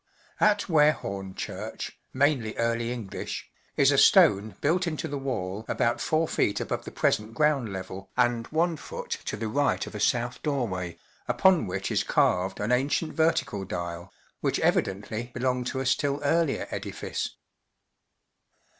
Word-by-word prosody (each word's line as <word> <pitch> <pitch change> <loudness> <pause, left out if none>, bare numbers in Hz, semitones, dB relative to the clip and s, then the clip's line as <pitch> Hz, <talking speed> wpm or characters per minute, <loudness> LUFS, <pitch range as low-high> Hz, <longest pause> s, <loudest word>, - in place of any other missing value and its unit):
At 210 -1 +4
VVarehorne 100 - +1
Church - - -6
{mainly 130 -5 +1
Early 115 0 0
English) 115 -6 -5 0.3
is - - +5
a - - +4
stone 105 +1 +5
built 175 +4 +1
into 155 -3 -2
the 140 0 -4
wall 105 -7 -3
about 120 0 +1
4ft. 155 -9 +1
above - - -3
the - - -7
present 110 +2 0
ground 140 -6 +2
level 95 0 -7
and 120 -2 +2
ift 165 0 -2
to - - -3
the 110 +1 -3
right 140 +6 +1
of - - -9
a 105 - -5
south 120 +3 0
doorway, 95 - -2 0.3
upon 185 - +4
which 95 +1 -3
is - - +2
carved 95 +1 +1
an 105 +4 -1
ancient 140 +5 +1
vertical 140 -10 +1
dial, 85 -2 -5 0.3
which - - 0
evidently 110 +5 0
be¬ 120 - -4
longed 125 -1 0
to 130 - -2
a - - -3
still 140 +1 +1
earlier 160 0 +1
edifice. - - -4
120 Hz, 145 wpm, -27 LUFS, 100-145 Hz, 0.3 s, is